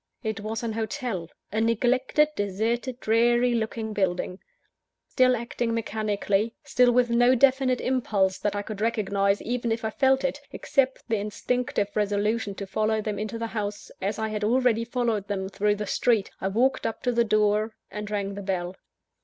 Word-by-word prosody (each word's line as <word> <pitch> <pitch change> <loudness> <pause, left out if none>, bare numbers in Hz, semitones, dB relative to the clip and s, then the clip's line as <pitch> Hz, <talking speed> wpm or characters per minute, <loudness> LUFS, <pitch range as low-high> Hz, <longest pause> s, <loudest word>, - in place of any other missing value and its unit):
It 220 -1 -2
was 220 +2 -4
an 225 -1 -2
hotel 225 - -3 0.2
a 215 +2 0
neglected, 255 +6 +2
deserted, 225 +5 -1
dreary 240 +2 +3
looking 220 -1 -2
building. 185 -1 -1 0.7
Still 255 0 +4
acting 235 0 -2
mechanically; 215 -1 -1
still 250 -1 +4
with 245 0 +3
no 245 +2 +5
definite 260 0 +3
impulse 205 -7 +1
that 205 0 -1
I 205 - -2
could 210 -1 -7
recognise, 200 -3 +1
even 240 -1 -1
if 225 0 -1
I 220 - -1
felt 265 +2 +3
it, 280 +1 -1
except 265 -2 0
the 225 -2 +1
instinctive 210 +1 -1
resolution 210 0 0
to 200 - -5
follow 215 +3 0
them 210 -1 -3
into 215 +2 -3
the 230 - -3
house, 210 -2 -4
as 200 +3 -1
I 220 0 -2
had 210 -1 -3
already 230 0 +2
followed 230 -4 -1
them 190 -2 -3
through 205 +1 +1
the 210 0 -4
street 220 0 +1
I 190 - 0
walked 240 +7 +1
up 225 - -6
to 250 - +2
the 235 0 +3
door, 215 0 +2 0.2
and 210 0 -5
rang 200 -1 -2
the 200 - -6
bell. 185 -2 -2
220 Hz, 175 wpm, -26 LUFS, 205-240 Hz, 0.7 s, no